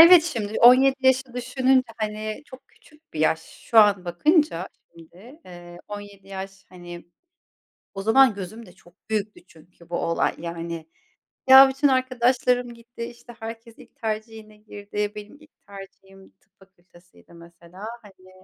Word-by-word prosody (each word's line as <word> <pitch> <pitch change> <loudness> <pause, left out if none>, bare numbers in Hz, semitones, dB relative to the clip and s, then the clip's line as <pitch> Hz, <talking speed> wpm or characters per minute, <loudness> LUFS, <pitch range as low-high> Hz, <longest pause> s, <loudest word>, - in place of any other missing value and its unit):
evet, 335 0 +9
şimdi, 220 -10 -4
17 265 +3 +6
yaşı 260 -1 +1
düşününce, 255 +1 +1
hani, 215 +2 -5
çok 260 +1 -15
küçük 305 +1 -25
bir 155 - -5
yaş. 160 +1 +2
Şu 225 +6 -2
an 200 -4 +5
bakınca 190 - +1 0.2
şimdi, 185 - -16
eee, 175 -1 -12
17 205 -1 -10
yaş, 195 0 -9
hani, 175 -2 -11 0.9
o 195 - -6
zaman 230 +3 +5
gözümde 200 +1 -9
çok 175 -2 -22 0.2
büyüktü 215 -1 -3
çünkü 170 +1 -21
bu 170 - -3
olay, 165 - 0
yani, 170 -1 -6 0.6
ya, 265 +1 +10
bütün 270 +2 +1
arkadaşlarım 250 -1 +1
gitti, 235 0 -10
işte 240 0 -12
herkes 225 +1 -9
ilk - - -18
tercihine 220 -2 -6
girdi 205 -1 -13 0.2
-benim 210 +5 -11
ilk 310 - -20 0.2
tercihim 195 -1 -14
tıp - - -40
fakültesiydi 180 -2 -23
mesela 170 +3 -13 0.2
hani, 185 -3 -18
215 Hz, 140 wpm, -23 LUFS, 185-250 Hz, 0.9 s, ya